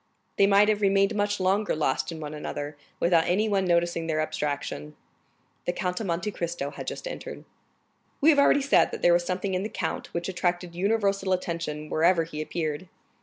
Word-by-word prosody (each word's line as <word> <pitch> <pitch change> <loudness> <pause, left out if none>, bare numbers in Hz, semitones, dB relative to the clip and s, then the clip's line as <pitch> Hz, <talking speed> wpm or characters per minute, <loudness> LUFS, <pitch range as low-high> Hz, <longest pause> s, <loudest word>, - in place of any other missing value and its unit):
They 200 - +5
might 200 +1 +5
have 215 -1 +1
remained 195 +1 +3
much 205 -1 0
longer 195 +3 +1
lost 150 +1 0
in 165 - -7
one 150 -1 -6
another, 150 -1 -5 0.2
without 170 -1 +3
anyone 200 +1 +1
noticing 170 -1 +1
their 155 -1 0
abstraction. 145 - -3 0.7
The 175 - 0
Count 180 0 -2
of 220 - -4
Monte 170 +4 -1
Cristo 170 -6 -3
had - - -8
just - - -5
entered. - - -7 0.7
We 310 +3 +6
have 290 - +3
already 280 0 +5
said 275 - +4
that - - -7
there 175 - +6
was 175 0 +2
something 185 +2 -2
in 185 - 0
the 210 - -3
count - - -4
which 170 0 -3
attracted 175 -1 -1
universal 195 0 +1
attention 165 -4 -3
wherever 165 +2 +3
he 155 -2 -6
appeared. 155 +1 -3
175 Hz, 185 wpm, -26 LUFS, 160-200 Hz, 0.7 s, We